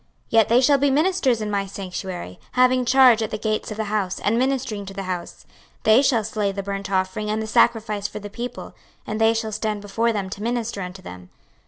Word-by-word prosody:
26:044:011 - - -39 0.2
Yet 225 -2 +4
they 240 +2 +5
shall 280 +2 +5
be 285 +1 +3
ministers 280 -5 +2
in 210 -1 -3
my 200 -1 0
sanctuary, 185 - -6
having 255 0 +3
charge 250 -2 +6
at 220 - -1
the 215 - -3
gates 215 0 -2
of 215 - -6
the 220 - -1
house, 205 -3 -2
and 210 - 0
ministering 250 -4 -1
to 195 - -8
the 195 - -4
house: 180 -2 -6 0.4
they 220 +4 +6
shall 245 -6 +2
slay 210 -1 -1
the 200 0 -5
burnt 195 0 -4
offering 190 +2 -1
and 215 +1 0
the 220 - -3
sacrifice 215 -2 +2
for 210 - -9
the 205 -1 -7
people, 235 +4 -7 0.3
and 215 +1 -4
they 225 +1 +4
shall 220 -1 -2
stand 210 0 -2
before 215 +3 0
them 205 -3 -2
to 200 - -6
minister 235 -2 -2
unto 185 +1 -7
them. 90 - -10
215 Hz, 225 wpm, -23 LUFS, 200-235 Hz, 0.4 s, charge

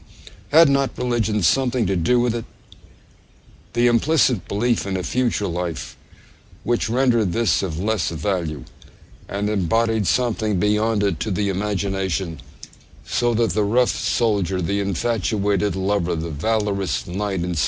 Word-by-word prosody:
Had 160 +3 +7
not 140 -1 +1
religion 115 -5 0
something 125 +4 +2
to 95 +1 0
do 95 +9 +2
with 120 -1 +1
it: 115 -1 -4 1.3
the 120 +1 +2
implicit 120 - +2
belief 115 +1 0
in 95 -1 -1
a 90 - -3
future 120 -3 0
life, 85 -1 -4 0.7
which 120 -2 0
rendered 120 -6 +2
this 115 -9 +2
of 85 -5 -3
less 100 -2 0
value, 80 -4 -3 0.7
and 100 +1 -2
embodied 110 +1 +1
something 110 -5 +1
beyond 105 +1 +1
it 100 -6 0
to - - -2
the 100 +1 0
imagination; 95 -4 -2 0.6
so 120 -1 0
that 115 -3 +1
the 105 +5 0
rough 120 +4 +2
soldier, 100 -6 0
the 100 +3 -1
infatuated 100 -1 0
lover, 95 -2 0
the 80 0 -4
valorous 100 +4 -1
knight, 95 0 -3
etc. 90 -2 -3
105 Hz, 140 wpm, -21 LUFS, 95-115 Hz, 1.3 s, Had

